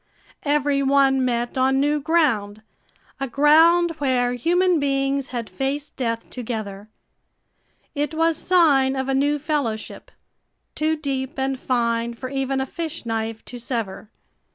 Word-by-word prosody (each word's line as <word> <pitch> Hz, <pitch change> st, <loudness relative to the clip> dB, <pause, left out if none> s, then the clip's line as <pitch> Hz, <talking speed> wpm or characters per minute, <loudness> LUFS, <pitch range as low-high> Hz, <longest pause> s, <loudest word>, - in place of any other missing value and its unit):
Every 290 Hz, -1 st, +1 dB
one 270 Hz, -1 st, +3 dB
met 240 Hz, 0 st, -1 dB
on 265 Hz, +1 st, +3 dB
new 295 Hz, +2 st, +1 dB
ground, 245 Hz, -10 st, 0 dB, 0.6 s
a 270 Hz, -, -2 dB
ground 320 Hz, +6 st, +5 dB
where 250 Hz, -3 st, +1 dB
human 350 Hz, +6 st, +2 dB
beings 275 Hz, -1 st, 0 dB
had 235 Hz, -3 st, -5 dB
faced 280 Hz, +2 st, -4 dB
death 230 Hz, -3 st, -3 dB
together. 215 Hz, -4 st, -6 dB, 1.0 s
It 295 Hz, +1 st, -2 dB
was 325 Hz, 0 st, +2 dB
sign 290 Hz, -7 st, +3 dB
of 265 Hz, 0 st, -2 dB
a 270 Hz, -, 0 dB
new 285 Hz, +2 st, +2 dB
fellowship, 285 Hz, -8 st, -3 dB, 0.6 s
too 310 Hz, +1 st, 0 dB
deep 275 Hz, -3 st, -4 dB
and 265 Hz, 0 st, -1 dB
fine 235 Hz, -2 st, -1 dB
for 255 Hz, +2 st, -6 dB
even 270 Hz, 0 st, -1 dB
a 265 Hz, -, -1 dB
fish 325 Hz, 0 st, -6 dB
knife 225 Hz, -1 st, -3 dB
to 245 Hz, -, -8 dB
sever. 225 Hz, -5 st, -4 dB
270 Hz, 135 wpm, -22 LUFS, 240-295 Hz, 1.0 s, ground